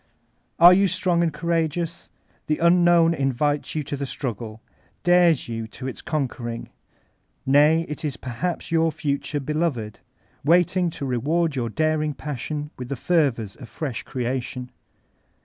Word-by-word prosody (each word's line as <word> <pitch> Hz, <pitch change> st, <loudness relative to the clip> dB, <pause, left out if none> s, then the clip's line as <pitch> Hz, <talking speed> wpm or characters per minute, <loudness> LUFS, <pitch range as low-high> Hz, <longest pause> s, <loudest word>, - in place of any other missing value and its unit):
Are 175 Hz, +2 st, +9 dB
you 195 Hz, +2 st, +4 dB
strong 180 Hz, -1 st, +1 dB
and 170 Hz, -1 st, +2 dB
courageous? 170 Hz, 0 st, -2 dB, 0.4 s
The 155 Hz, -, +1 dB
Unknown 170 Hz, -1 st, +5 dB
in* 135 Hz, -4 st, 0 dB
vites 145 Hz, +4 st, -1 dB
you 155 Hz, -, -1 dB
to 145 Hz, -, -4 dB
the 140 Hz, 0 st, -4 dB
struggle, 115 Hz, -4 st, -5 dB, 0.4 s
dares 175 Hz, -4 st, +4 dB
you 115 Hz, -1 st, -4 dB
to 130 Hz, +3 st, -9 dB
its 130 Hz, -, -6 dB
conquering. 120 Hz, -6 st, -3 dB, 0.7 s
Nay, 150 Hz, +4 st, +4 dB
it 150 Hz, +2 st, -6 dB
is 150 Hz, -3 st, -3 dB
perhaps 150 Hz, +10 st, -4 dB
your 165 Hz, -1 st, +3 dB
future 145 Hz, 0 st, -2 dB
beloved, 140 Hz, -7 st, -2 dB, 0.4 s
waiting 175 Hz, +3 st, +3 dB
to 150 Hz, -3 st, -6 dB
reward 145 Hz, +6 st, 0 dB
your 120 Hz, -3 st, -1 dB
daring 155 Hz, +2 st, 0 dB
passion 150 Hz, +2 st, -5 dB
mth 125 Hz, -, -5 dB
the 140 Hz, -, -3 dB
fervors 135 Hz, -, 0 dB
of 120 Hz, -, -12 dB
fresh 135 Hz, -8 st, -4 dB
creation. 125 Hz, 0 st, -4 dB
150 Hz, 145 wpm, -24 LUFS, 130-165 Hz, 0.7 s, Are